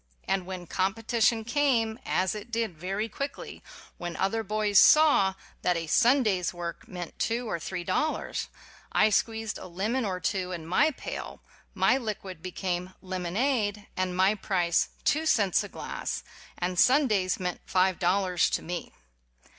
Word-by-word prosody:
And 190 -2 0
when 185 -2 -6
com 190 +4 0
petition 225 0 +1
came, 235 -4 +1
as 185 0 +1
it 210 +2 -7
did 225 -5 -2
very 195 +7 -3
quickly 280 +6 -6 0.4
when 175 -1 -4
other 195 +6 0
boys 210 -1 +3
saw 285 -9 +6 0.3
that 180 -1 +2
a 165 - -3
Sunday's 215 - +3
work 170 -1 -6
meant 175 -3 -7
two 235 +2 -1
or 170 - -2
three 180 +1 -4
dollars, 310 - -1 0.4
I 215 - +4
squeezed 225 0 0
a - - -8
lemon 210 +9 -1
or 190 -4 -2
two 185 +1 -1
in 165 -2 -6
my 185 - +3
pail, 295 - -7 0.3
my 265 - +3
liquid 195 -7 -5
became 180 0 -3
"lemonade" 205 +4 -1
and 185 -1 -1
my 190 +2 +4
price 180 -5 +1
two 315 +2 +1
cents 200 - +3
a - - -8
glass, - - -5 0.3
and 180 0 -1
Sun 270 +3 +5
days 190 -5 +1
meant 180 -1 -3
five 185 0 +2
dollars 180 0 +2
to - - -2
me. 175 +1 -5
195 Hz, 155 wpm, -28 LUFS, 180-225 Hz, 0.4 s, saw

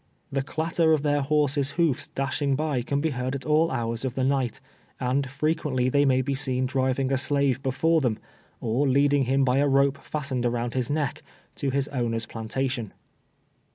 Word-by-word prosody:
The 135 0 0
clatter 160 +3 +1
of 150 -2 +1
their 145 -1 +2
lior 150 +1 +2
ses' 140 0 -1
hoofs 165 -7 +1
dashing 135 +1 -1
by 150 -3 -1
can 140 +3 -1
be 160 0 0
heard 130 +1 -2
at 135 - -6
all 155 +2 +3
hours 115 -3 -2
of 130 -2 -3
the 130 - 0
night, 135 -3 0 0.4
and 130 +2 0
frerpiently 135 -2 0
they 145 +1 +3
may 130 -1 +3
be 140 - -1
seen 130 -2 -1
driving 130 0 0
a - - +3
slave 140 -1 +1
before 160 +5 +2
them, 120 -5 0 0.4
or 120 +5 0
leading 140 +1 +3
him 135 +2 +2
by 130 +1 +2
a 145 - +3
rope 140 0 +3
fastened 140 -5 -3
around 120 0 -2
his 125 -2 -1
neck, 145 -2 -1 0.4
to 140 -6 -1
his 140 +1 0
owner's 115 -4 -1
plantation. 115 0 -3
135 Hz, 190 wpm, -26 LUFS, 130-145 Hz, 0.4 s, all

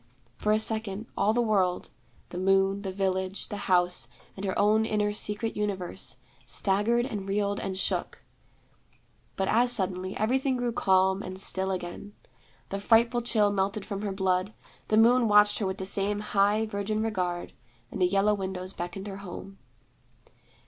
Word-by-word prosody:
For 210 - -1
a 215 - +4
second, 220 -1 0
all 210 - +2
the 240 +2 +1
world 190 -5 0 0.4
the 180 - -6
moon, 195 +1 +2
the 195 -2 -4
village, 190 0 -2
the 205 - -4
house, 175 -8 +5 0.3
and 190 - -8
her 190 - -2
own 215 +2 +3
inner 210 -2 0
secret 210 +2 -2
universe 200 -4 -3 0.3
staggered 215 +5 +1
and 205 -6 -5
reeled 200 0 0
and 190 -1 -4
shook. - - -2 1.1
But 190 - -1
as 240 +2 +3
suddenly, 185 -4 0
everything 260 +4 +1
grew 245 -1 -1
calm 190 -2 +2
and 185 -1 -7
still 190 -1 +2
again. 185 +2 -6 0.5
The 195 - -3
frightful 235 +3 +3
chill 215 -3 +2
melted 200 +1 -1
from 200 -2 -5
her 205 -2 -2
blood; 190 +1 0 0.3
the 215 - +2
moon 235 +2 +5
watched 210 0 +5
her 205 - -1
with 190 0 -3
the 190 - -5
same 200 +1 -1
high 210 +1 +2
virgin 215 +1 -2
regard, 180 -5 -3 0.4
and - - -5
the 180 - +5
yellow 200 +3 +2
windows 190 -1 -4
beckoned 175 +3 -6
her 195 -2 -6
home. 195 0 -9
200 Hz, 160 wpm, -27 LUFS, 190-215 Hz, 1.1 s, house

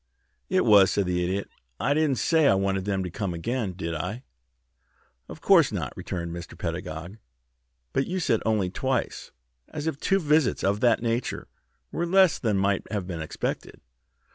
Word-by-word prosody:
"It - - +2
was," 100 -2 +7
said 100 - 0
the 90 0 0
Idiot. 95 +3 -2 0.3
"I 145 - +2
didn't 150 -3 +1
say 160 +1 +3
I 100 - +5
wanted 95 -1 0
them 100 -2 -1
to 90 - -5
come 95 -1 -3
again, 110 +3 -2
did 85 -2 -4
I?" 90 - -4 1.1
"Of - - -10
course - - +5
not," - - -4
returned 85 -2 -5
Mr. 85 -1 -9
Pedagog. 85 +2 -5 0.8
"But 135 - 0
you 185 +1 -2
said 115 -10 +1
'only 105 -5 0
twice,' 130 +3 -2 0.4
as 150 -1 -6
if 160 -3 -2
two 195 - +2
visits 150 -5 +2
of 100 +1 +1
that 120 0 +3
nature 115 +1 -2 0.4
were 170 - -2
less 190 -1 +4
than 110 -5 0
might 100 0 0
have 100 -4 -2
been 85 -3 -5
expected." 80 - -4
100 Hz, 170 wpm, -26 LUFS, 90-135 Hz, 1.1 s, was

